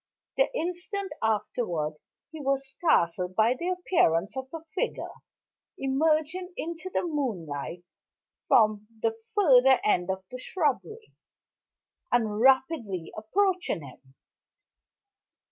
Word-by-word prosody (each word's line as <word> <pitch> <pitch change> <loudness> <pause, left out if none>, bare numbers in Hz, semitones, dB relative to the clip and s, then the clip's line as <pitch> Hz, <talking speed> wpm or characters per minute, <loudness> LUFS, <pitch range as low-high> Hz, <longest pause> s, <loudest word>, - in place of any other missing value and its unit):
The - - +3
instant 360 +3 -3
afterward 205 -7 -1 0.4
he 315 -1 -8
was 275 0 0
startled 180 - +1
by 220 +4 +4
the 340 +8 -3
appearance 245 - +1
of 265 0 -4
a 325 -1 -7
figure, - - -2 0.6
emerging 315 +6 0
into 335 +2 -5
the - - 0
moonlight 180 - -3 0.6
from 215 -2 +4 0.2
the 450 - +1 0.2
further 265 -9 +6
end 180 -3 +2
of 190 0 -2
the 255 - -6
shrubbery, 375 - -2 1.0
and 220 -3 +1
rapidly 255 - +2
approaching 360 - 0
him. 130 0 -15
265 Hz, 105 wpm, -28 LUFS, 200-335 Hz, 1.0 s, further